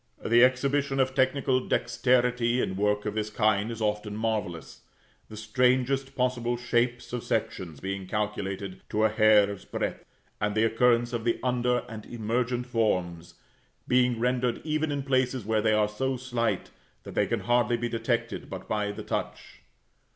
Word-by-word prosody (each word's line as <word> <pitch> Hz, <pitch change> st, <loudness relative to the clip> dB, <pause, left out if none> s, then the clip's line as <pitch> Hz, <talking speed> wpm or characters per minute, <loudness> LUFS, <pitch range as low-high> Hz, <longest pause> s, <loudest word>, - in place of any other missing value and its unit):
The 120 Hz, +2 st, +6 dB
exhibition 135 Hz, +2 st, +2 dB
of 130 Hz, 0 st, +2 dB
technical 130 Hz, 0 st, +2 dB
dexterity 125 Hz, 0 st, +2 dB
in 95 Hz, -, -1 dB
work 105 Hz, +1 st, 0 dB
of 105 Hz, -, -2 dB
this 110 Hz, 0 st, -2 dB
kind 105 Hz, 0 st, +1 dB
is 115 Hz, -1 st, -4 dB
often 105 Hz, 0 st, -2 dB
marvellous, 105 Hz, -7 st, -3 dB, 0.5 s
the 110 Hz, -, -9 dB
strangest 130 Hz, +4 st, +1 dB
possible 125 Hz, -1 st, 0 dB
shapes 120 Hz, 0 st, -1 dB
of 125 Hz, -, -3 dB
sections 95 Hz, -9 st, -3 dB
being 95 Hz, 0 st, -4 dB
calculated 100 Hz, -2 st, -3 dB
to 110 Hz, -, 0 dB
a 110 Hz, -, +5 dB
hair's 105 Hz, -2 st, +4 dB
breadth, -, -, -4 dB, 0.4 s
and 105 Hz, 0 st, -1 dB
the 110 Hz, -, +3 dB
occurrence 120 Hz, +1 st, +2 dB
of 115 Hz, -1 st, -2 dB
the 115 Hz, 0 st, 0 dB
under 125 Hz, -1 st, +1 dB
and 110 Hz, -2 st, -9 dB
emergent 120 Hz, +2 st, -1 dB
forms 90 Hz, -8 st, -1 dB, 0.5 s
being 125 Hz, -2 st, +3 dB
rendered, 125 Hz, 0 st, 0 dB
even 155 Hz, 0 st, -1 dB
in 140 Hz, -1 st, -2 dB
places 130 Hz, -3 st, 0 dB
where 110 Hz, 0 st, +1 dB
they 110 Hz, 0 st, +2 dB
are 105 Hz, -1 st, +3 dB
so 130 Hz, +5 st, -2 dB
slight 120 Hz, -2 st, -2 dB, 0.3 s
that -, -, -9 dB
they -, -, +1 dB
can -, -, -1 dB
hardly 120 Hz, -1 st, +2 dB
be 120 Hz, 0 st, -2 dB
detected 115 Hz, -1 st, -2 dB
but -, -, -7 dB
by 105 Hz, -1 st, -1 dB
the -, -, -7 dB
touch. -, -, -5 dB
115 Hz, 160 wpm, -27 LUFS, 105-125 Hz, 0.5 s, The